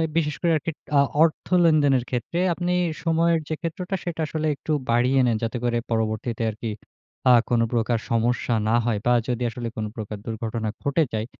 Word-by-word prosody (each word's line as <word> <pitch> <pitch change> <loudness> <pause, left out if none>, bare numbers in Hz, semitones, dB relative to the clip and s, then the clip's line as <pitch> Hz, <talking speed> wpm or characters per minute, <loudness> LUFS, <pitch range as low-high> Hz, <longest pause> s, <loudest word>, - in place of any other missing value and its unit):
বিশেষ 150 -3 +1
করে 170 - +2
আরকি 160 +3 -3 0.3
আ - - +7 0.2
অর্থ 165 -1 0 0.2
লেনদেনের 145 -6 +4
ক্ষেত্রে 125 +8 -2
আপনি 175 +1 -2 0.3
সময়ের 165 0 +2
যে 155 - -1
ক্ষেত্রটা, 180 +3 -3
সেটা 170 -2 -4
আসলে 155 0 -2
একটু 155 - -6 0.2
বাড়িয়ে 125 +3 +3
নেন। 120 -2 +2
যাতে 115 +1 -2
করে 120 -1 +1
পরবর্তীতে 110 +1 -1
আরকি 110 +2 -5 0.6
আ - - +8 0.2
কোন 120 -1 +3
প্রকার 120 0 +1
সমস্যা 120 +1 +1
না 110 - +3
হয় 115 -3 +1
বা 120 - +3 0.2
যদি 125 -1 -1
আসলে 120 0 -5
কোন 110 - -2
প্রকার 105 -2 -5
দুর্ঘটনা 110 -1 -3
ঘটে 140 +3 +2
যায়? 110 0 -1
125 Hz, 180 wpm, -24 LUFS, 115-160 Hz, 0.6 s, আ